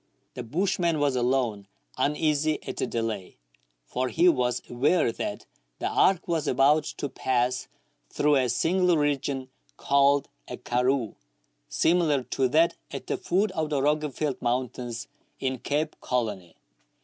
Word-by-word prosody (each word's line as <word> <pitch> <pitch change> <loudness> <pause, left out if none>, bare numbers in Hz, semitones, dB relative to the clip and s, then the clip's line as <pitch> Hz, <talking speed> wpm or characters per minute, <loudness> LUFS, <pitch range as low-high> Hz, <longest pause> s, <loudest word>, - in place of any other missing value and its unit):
The 125 - -6
bushman 170 - 0
was 145 -2 +1
alone 120 -5 0 0.3
uneasy 150 +2 +1
at - - -5
the - - -1
delay, 115 -5 -4 0.5
for 125 - -2
he 170 +6 +3
was 125 -7 +2
aware 135 +3 +2
that - - -5 0.3
the - - -2
arc 185 -2 +2
was 165 -4 -1
about 145 +4 +4
to - - -4
pass 130 -1 -1 0.4
through 145 -1 +2
a 130 -2 +1
singular 175 +7 +2
region 140 -2 -1 0.3
called 140 0 +3 0.2
a - - -6
"karroo," 125 -1 0 0.6
similar 160 -6 +2
to 130 +1 0
that 165 +5 +4 0.2
at - - -7
the - - -2
foot 195 +4 0
of 155 -1 -2
the 145 -2 0
Roggeveld 150 0 -1
mountains 120 -1 -2 0.3
in 130 -1 -2
Cape 150 +4 -1
Colony. 105 -9 -2
135 Hz, 135 wpm, -26 LUFS, 125-155 Hz, 0.6 s, about